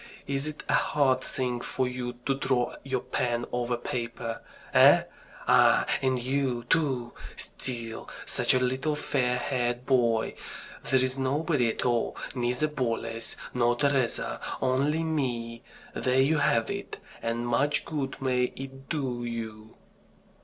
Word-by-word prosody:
Is 140 Hz, +1 st, -1 dB
it 155 Hz, -1 st, -6 dB
a -, -, +1 dB
hard 130 Hz, -3 st, +3 dB
thing 125 Hz, -3 st, -2 dB
for 130 Hz, +1 st, -1 dB
you 125 Hz, -1 st, -4 dB
to 135 Hz, -, +2 dB
draw 130 Hz, -2 st, 0 dB
your 130 Hz, -2 st, -2 dB
pen 120 Hz, -1 st, -1 dB
over 120 Hz, 0 st, 0 dB
paper? 115 Hz, -1 st, -4 dB, 0.3 s
Eh? -, -, +8 dB, 0.4 s
Ah, -, -, +6 dB, 0.2 s
and 130 Hz, -1 st, +2 dB
you, 130 Hz, -1 st, 0 dB
too! 130 Hz, -4 st, +1 dB, 0.2 s
Still 115 Hz, -3 st, -4 dB, 0.2 s
such -, -, +2 dB
a -, -, +4 dB
little 130 Hz, +4 st, 0 dB
fair 125 Hz, -4 st, 0 dB
haired 125 Hz, -1 st, -1 dB
boy! 120 Hz, -4 st, +2 dB, 0.5 s
There's 130 Hz, 0 st, +2 dB
nobody 140 Hz, -1 st, +1 dB
at 110 Hz, -, -2 dB
all, 120 Hz, -2 st, +1 dB, 0.2 s
neither 125 Hz, +3 st, 0 dB
Boles, 115 Hz, -5 st, -2 dB, 0.2 s
nor 120 Hz, -1 st, +3 dB
Teresa, 135 Hz, -2 st, 0 dB, 0.2 s
only 140 Hz, +5 st, +1 dB
me. 120 Hz, -7 st, -2 dB, 0.3 s
There 130 Hz, +1 st, +1 dB
you 150 Hz, +3 st, +4 dB
have 115 Hz, -4 st, +2 dB
it, -, -, -5 dB, 0.2 s
and 115 Hz, +1 st, -1 dB
much 145 Hz, +5 st, +2 dB
good 140 Hz, -5 st, -3 dB
may 125 Hz, -2 st, +2 dB
it 135 Hz, 0 st, -9 dB
do 130 Hz, -6 st, -2 dB
you!" 110 Hz, -2 st, -6 dB
125 Hz, 135 wpm, -28 LUFS, 120-135 Hz, 0.5 s, Eh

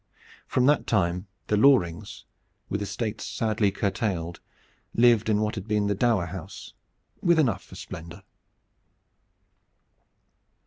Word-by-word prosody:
From 125 Hz, -, +2 dB
that 145 Hz, +2 st, +3 dB
time 90 Hz, -2 st, 0 dB, 0.2 s
the 105 Hz, -, +1 dB
Lorings, 100 Hz, -, +2 dB, 0.4 s
with 100 Hz, -, -2 dB
estates 110 Hz, +2 st, -3 dB
sadly 110 Hz, -2 st, 0 dB
curtailed, 95 Hz, -4 st, -2 dB, 0.6 s
lived 115 Hz, -2 st, +4 dB
in 105 Hz, -1 st, +2 dB
what 110 Hz, +1 st, 0 dB
had 100 Hz, -3 st, -6 dB
been 105 Hz, -1 st, +1 dB
the 100 Hz, -, +1 dB
dower 105 Hz, -3 st, +2 dB
house, 90 Hz, +2 st, -9 dB, 0.5 s
with 170 Hz, -1 st, +4 dB
enough 120 Hz, -11 st, +2 dB
for -, -, -14 dB
splendor. 85 Hz, +4 st, -9 dB
105 Hz, 120 wpm, -26 LUFS, 95-115 Hz, 0.6 s, lived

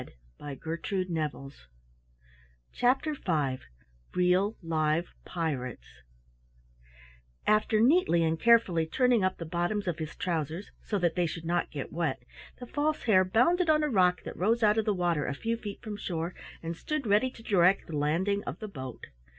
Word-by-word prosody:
CHAPTER 265 Hz, +5 st, +2 dB
V 150 Hz, -, -1 dB, 0.6 s
REAL 180 Hz, +4 st, +2 dB
LIVE 160 Hz, +1 st, 0 dB
PIRATES 130 Hz, -, -3 dB, 1.6 s
After 215 Hz, 0 st, +3 dB
neatly 235 Hz, -, +4 dB
and 160 Hz, 0 st, 0 dB
carefully 200 Hz, -9 st, +4 dB
turning 245 Hz, +3 st, +2 dB
up 185 Hz, 0 st, 0 dB
the 165 Hz, -, -6 dB
bottoms 175 Hz, +5 st, -1 dB
of 170 Hz, -2 st, -2 dB
his 155 Hz, 0 st, -5 dB
trousers 165 Hz, 0 st, -3 dB
so 210 Hz, -, -2 dB
that 175 Hz, -3 st, +1 dB
they 175 Hz, -2 st, +1 dB
should 165 Hz, +1 st, -6 dB
not 175 Hz, +1 st, 0 dB
get 140 Hz, -3 st, -6 dB
wet, 160 Hz, -5 st, -1 dB, 0.4 s
the 250 Hz, -, -7 dB
False 300 Hz, +4 st, -1 dB
Hare 190 Hz, -5 st, +5 dB
bounded 315 Hz, -, +2 dB
on 305 Hz, -1 st, +4 dB
a 300 Hz, -, +1 dB
rock 180 Hz, -6 st, +3 dB
that -, -, -7 dB
rose 225 Hz, +5 st, +1 dB
out 210 Hz, +1 st, +4 dB
of 220 Hz, -, 0 dB
the 210 Hz, -, +1 dB
water 175 Hz, -5 st, 0 dB
a 140 Hz, -, -2 dB
few 230 Hz, +10 st, -1 dB
feet 210 Hz, -3 st, -8 dB
from 215 Hz, -3 st, -5 dB
shore, 170 Hz, -3 st, -3 dB, 0.3 s
and 165 Hz, +1 st, -3 dB
stood 305 Hz, -, -3 dB
ready 210 Hz, +5 st, +3 dB
to 230 Hz, -3 st, -15 dB
direct 190 Hz, -2 st, +3 dB
the 160 Hz, -, -6 dB
landing 175 Hz, +8 st, 0 dB
of -, -, -5 dB
the 215 Hz, -, -6 dB
boat. 130 Hz, -, -8 dB
185 Hz, 160 wpm, -29 LUFS, 165-220 Hz, 1.6 s, Hare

